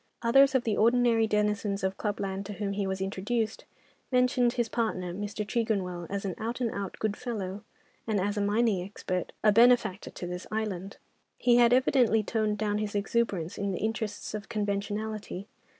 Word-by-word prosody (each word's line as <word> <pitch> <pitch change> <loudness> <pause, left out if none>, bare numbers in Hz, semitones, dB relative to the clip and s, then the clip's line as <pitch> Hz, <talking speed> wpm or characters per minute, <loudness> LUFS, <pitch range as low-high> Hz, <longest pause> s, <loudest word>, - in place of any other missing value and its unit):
Others 270 +4 +5
of 255 - +3
the 220 -4 0
ordinary 230 0 +4
denizens 210 -1 0
of 190 0 0
club 205 0 -3
land 195 0 -3
to 210 - -5
whom 200 -1 -3
he 200 -1 -1
was 190 0 -3
introduced 215 +4 -2 0.5
mentioned 250 -1 +3
his 240 -2 0
partner, 200 -7 -2
Mr. 205 +2 -4
Tregonwell, 195 -7 -1
as 200 0 -3
an 190 - -2
out 230 +3 -3
and 235 -3 0
out 200 -1 -5
good 215 -1 -1
fellow, 205 -4 -5 0.4
and, 215 -2 +1
as 205 +2 0
a 205 - 0
mining 205 -1 +2
expert, 185 -1 -4
a 215 - +6
benefactor 230 -3 +4
to - - -7
this 180 +1 -6
island. 200 -3 -3 0.4
He 240 -1 +4
had 240 -1 +6
evidently 245 -3 +4
toned 215 -1 0
down 210 0 0
his 210 -1 -3
exuberance 200 -5 -1
in 200 -1 -1
the - - -2
interests 220 -2 -3
of 210 -1 -6
conventionality. 205 -1 -3
210 Hz, 180 wpm, -29 LUFS, 195-230 Hz, 0.5 s, a